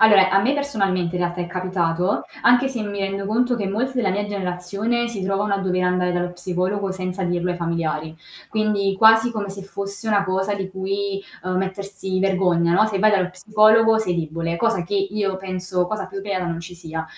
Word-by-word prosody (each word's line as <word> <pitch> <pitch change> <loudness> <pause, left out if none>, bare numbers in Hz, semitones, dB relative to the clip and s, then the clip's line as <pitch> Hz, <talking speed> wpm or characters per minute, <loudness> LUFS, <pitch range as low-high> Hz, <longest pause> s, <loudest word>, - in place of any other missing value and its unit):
Allora 205 -4 +7
a 195 +1 +4
me 260 +7 +2
personalmente 195 -11 0
in 180 - 0
realtà 175 0 -2
è 175 - -2
capitato 180 0 0 0.2
anche 245 +3 +5
se 255 -3 -4
mi 205 -1 -4
rendo 195 0 -2
conto 245 +3 +1
che 205 - -2
molti 245 +7 -2
della 220 -6 +1
mia 205 +2 -1
generazione 200 +5 -2
si 205 -5 -4
trovano 200 +1 0
a - - 0
dover 185 -1 0
andare 180 0 +1
dallo 175 0 -1
psicologo 185 +2 -2
senza 185 0 -3
dirlo 175 0 -1
ai 175 - -2
familiari, 160 -2 -2 0.3
quindi 210 -2 +1
quasi 225 +3 +6
come 210 -3 -3
se 195 0 -7
fosse 200 +2 -6
una 205 -2 +3
cosa 190 +1 -1
di 190 -1 -4
cui, 195 +1 -2 0.2
uhm, 185 0 -2
mettersi 190 0 -3
vergogna 180 -3 +2
no, 210 +4 +5
se 205 -3 -2
vai 215 +1 +5
dallo 185 -3 +2
psicologo 215 +3 +4
sei 185 -5 0
debole, 165 0 -2
cosa 210 -4 +1
che 205 - -4
io 195 0 0
penso 185 -1 -2
cosa 200 -2 -3
più 195 +1 -6
vera 195 -3 -2
non 170 -1 -3
ci 175 +1 -9
sia. 160 -1 -5
195 Hz, 205 wpm, -22 LUFS, 180-205 Hz, 0.3 s, Allora